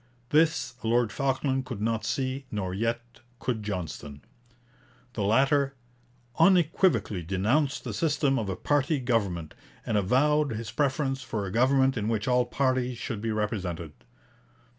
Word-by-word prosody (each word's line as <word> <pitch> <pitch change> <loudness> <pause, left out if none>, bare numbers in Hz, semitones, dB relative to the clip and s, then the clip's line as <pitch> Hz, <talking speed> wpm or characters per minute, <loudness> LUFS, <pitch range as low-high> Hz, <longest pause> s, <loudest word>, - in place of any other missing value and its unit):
This 160 +1 +2
Lord 115 0 +2
Falkland 135 0 -1
could 120 -5 -5
not 110 0 -1
see, 130 +3 -2
nor 95 -4 -3
yet 115 +3 -3 0.2
could 120 -3 -2
Johnston. 80 -8 -5 0.9
The 110 - -3
latter 135 +6 +2 0.6
'unequivocally 170 - +3
denounced 110 - 0
the - - -5
system 145 -4 +1
of 105 -3 -3
a 95 - -2
party 145 - +1
government, 100 -10 -1 0.3
and 110 - 0
avowed 140 +7 +2
his 110 0 -5
preference 135 +1 0
for 110 -6 -3
a 95 - -5
government 130 +3 +3
in 105 -1 -1
which 110 -2 -1
all 125 -1 +3
parties 130 -2 0
should 115 -2 -4
be 115 - -2
represented.' 95 -7 -3
120 Hz, 140 wpm, -27 LUFS, 105-135 Hz, 0.9 s, unequivocally